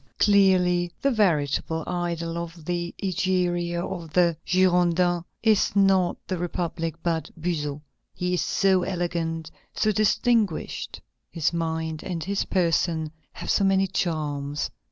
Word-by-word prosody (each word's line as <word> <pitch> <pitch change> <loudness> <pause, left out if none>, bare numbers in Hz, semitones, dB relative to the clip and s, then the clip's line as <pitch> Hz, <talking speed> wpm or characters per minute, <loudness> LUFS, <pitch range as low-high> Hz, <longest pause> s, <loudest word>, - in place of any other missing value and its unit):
Clearly, 180 -3 +4
the 275 - +2
veritable 160 - +1
idol 170 -1 -2
of 170 -1 -8
the 175 0 -2
Egeria 175 -2 0
of 165 -3 -6
the 175 -2 +4
Girondins 180 -1 +3 0.2
is 215 -3 +3
not 195 -3 +3
the 185 -2 -3
republic, 170 -2 -3
but 165 -2 -1
Buzot. 150 -4 -2 0.3
He 180 0 -2
is 180 - +1
so 190 -2 +2
elegant, 170 -3 -2 0.2
so 215 - +2
distinguished! 215 -2 0 0.3
His 165 0 -1
mind 160 -1 -2
and 170 -4 -4
his 200 +1 -1
person 165 -3 +1 0.2
have - - -3
so - - +3
many 195 0 +3
charms! 150 -6 -2
175 Hz, 125 wpm, -25 LUFS, 165-185 Hz, 0.3 s, Clearly